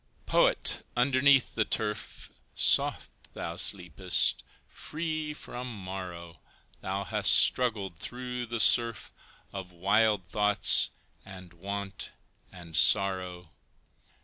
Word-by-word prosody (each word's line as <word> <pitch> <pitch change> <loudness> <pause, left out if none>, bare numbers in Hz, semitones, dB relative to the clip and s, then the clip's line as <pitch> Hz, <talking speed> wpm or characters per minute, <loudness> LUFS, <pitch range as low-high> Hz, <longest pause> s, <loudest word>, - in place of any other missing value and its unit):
Poet! - - +2
underneath 135 +1 +2
the 110 - 0
turf, 105 -1 -5 0.2
Soft - - +1 0.2
thou 85 - -7
sleepest, 90 -1 0 0.2
free 155 -1 -6
from 125 -4 -8
morrow, 90 -4 -9 0.4
Thou 95 +1 -4
hast - - +4
struggled 105 -9 +3
through 125 +3 -6
the 115 0 -5
surf 115 +5 +2 0.4
Of 95 -2 -8
wild 100 +2 0
thoughts 105 +2 +3 0.3
and 90 -3 -13
want 100 +3 -7 0.4
and 85 -3 -12
sorrow. 90 0 +1
100 Hz, 95 wpm, -27 LUFS, 90-120 Hz, 0.4 s, hast